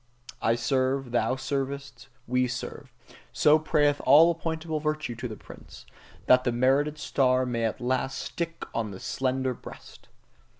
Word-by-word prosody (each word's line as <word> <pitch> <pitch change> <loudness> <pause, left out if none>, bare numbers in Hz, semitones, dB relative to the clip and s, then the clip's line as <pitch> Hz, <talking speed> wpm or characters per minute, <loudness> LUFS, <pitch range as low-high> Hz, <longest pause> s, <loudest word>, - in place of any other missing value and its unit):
"I 115 - +2
serve, 130 +2 0
thou 120 +2 +1
servest, 140 +1 -4 0.2
we 125 +1 +1
serve" 120 0 -6 0.4
so 150 +1 +4
prayeth 150 -2 +1
all 160 +5 +7
appointable 160 -1 -4
virtue 155 -4 -2
to 120 +2 -5
the 110 - -7
prince: - - -14 0.4
that 125 0 +5
the 125 - +1
merited 135 +5 +2
star 130 -3 +1
may 115 -2 -1
at 110 - -2
last 130 +2 -1
stick 165 -1 -5
on 115 -2 -2
the 95 -2 -9
slender 130 0 -1
breast! - - -13
130 Hz, 145 wpm, -27 LUFS, 125-150 Hz, 0.4 s, all